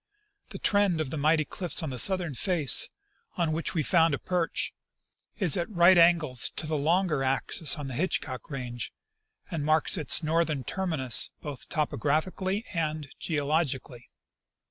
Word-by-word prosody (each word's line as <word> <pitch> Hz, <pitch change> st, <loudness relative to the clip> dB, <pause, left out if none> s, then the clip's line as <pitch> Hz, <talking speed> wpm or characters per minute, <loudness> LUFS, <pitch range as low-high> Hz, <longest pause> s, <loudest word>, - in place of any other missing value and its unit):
The -, -, -8 dB
trend 200 Hz, -5 st, +1 dB
of 150 Hz, -4 st, -3 dB
the 160 Hz, -, -4 dB
mighty 155 Hz, +1 st, +2 dB
cliffs 180 Hz, +1 st, 0 dB
on 155 Hz, -, -4 dB
the 125 Hz, -, -3 dB
southern 180 Hz, -3 st, +3 dB
face, 160 Hz, -, +3 dB, 0.5 s
on 170 Hz, -2 st, 0 dB
Avhich 155 Hz, +3 st, -3 dB
we 155 Hz, -, 0 dB
have -, -, -2 dB
found 165 Hz, -3 st, +3 dB
a -, -, -6 dB
perch, 175 Hz, +1 st, -2 dB, 0.6 s
is 185 Hz, -9 st, +4 dB
at 170 Hz, -, -2 dB
right 180 Hz, -2 st, +5 dB
angles 165 Hz, -7 st, +3 dB
to -, -, -4 dB
the 155 Hz, 0 st, -2 dB
longer 155 Hz, 0 st, 0 dB
axis 135 Hz, +4 st, 0 dB
of 145 Hz, -2 st, -6 dB
the 130 Hz, -, -6 dB
Hitchcock 145 Hz, -3 st, -3 dB
range, 125 Hz, -4 st, -6 dB, 0.6 s
and 160 Hz, -4 st, -3 dB
marks 155 Hz, +4 st, +2 dB
its 155 Hz, +1 st, +2 dB
northern 155 Hz, -3 st, 0 dB
terminus 160 Hz, -, +2 dB
both 145 Hz, -4 st, -7 dB
topographically 175 Hz, -, -2 dB
and 155 Hz, -3 st, -3 dB
geologically. 145 Hz, -5 st, -2 dB
155 Hz, 155 wpm, -27 LUFS, 140-175 Hz, 0.6 s, right